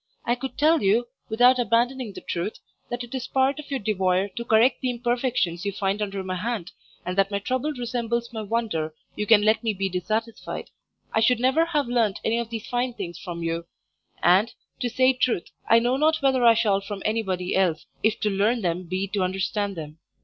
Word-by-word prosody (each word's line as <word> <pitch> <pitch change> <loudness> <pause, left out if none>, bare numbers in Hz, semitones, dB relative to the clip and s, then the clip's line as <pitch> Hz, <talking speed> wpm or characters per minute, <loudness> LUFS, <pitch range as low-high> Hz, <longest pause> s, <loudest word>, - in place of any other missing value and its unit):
I 240 - +2
could 260 +2 -5
tell 315 +2 +4
you, 210 +5 +3 0.2
without 245 +3 +5
abandoning 240 0 +1
the - - -9
truth, 175 +5 -2 0.3
that 240 0 -3
it 240 - -10
is 260 -1 -3
part 270 +2 +1
of 300 - -9
your 275 -2 -1
devoyre 190 -2 +1
to 235 +5 -6
correct 235 +3 +3
the 255 - 0
imperfections 240 -7 -1
you 200 - -1
find 195 +1 -1
under 195 -2 -3
my 185 0 -3
hand, 210 -2 -3 0.3
and 180 +1 -2
that 195 0 +3
my 200 - -1
trouble 255 +8 -1
resembles 235 -1 -2
my 220 - -3
wonder 205 -8 -2 0.2
you 210 - -3
can 210 -1 +6
let 215 +2 +3
me 220 -2 0
be 195 0 -1
dissatisfied. 215 +5 -3 0.4
I - - +3
should 230 +1 +3
never 265 +7 +3
have 300 -4 0
learnt 230 -5 +1
any 230 +1 +2
of 235 -1 -4
these 225 -1 -5
fine 245 0 -1
things 175 -5 -6
from 170 -3 -6
you; 165 0 -2 0.6
and, 190 +6 +5 0.3
to 245 - -1
say 255 +2 +3
truth, 245 -8 -1 0.2
I 230 - +7
know 245 +3 +2
not 310 +1 +2
whether 265 -2 +3
I 230 -1 +7
shall 210 -4 +2
from 195 0 -6
anybody 190 -5 -1
else, 175 -5 +1 0.2
if 220 0 +1
to 210 - +2
learn 215 +4 +1
them 175 +1 -1
be 185 +3 -2
to 200 0 -1
understand 195 +2 -1
them. 155 -1 -8
220 Hz, 210 wpm, -25 LUFS, 195-245 Hz, 0.6 s, I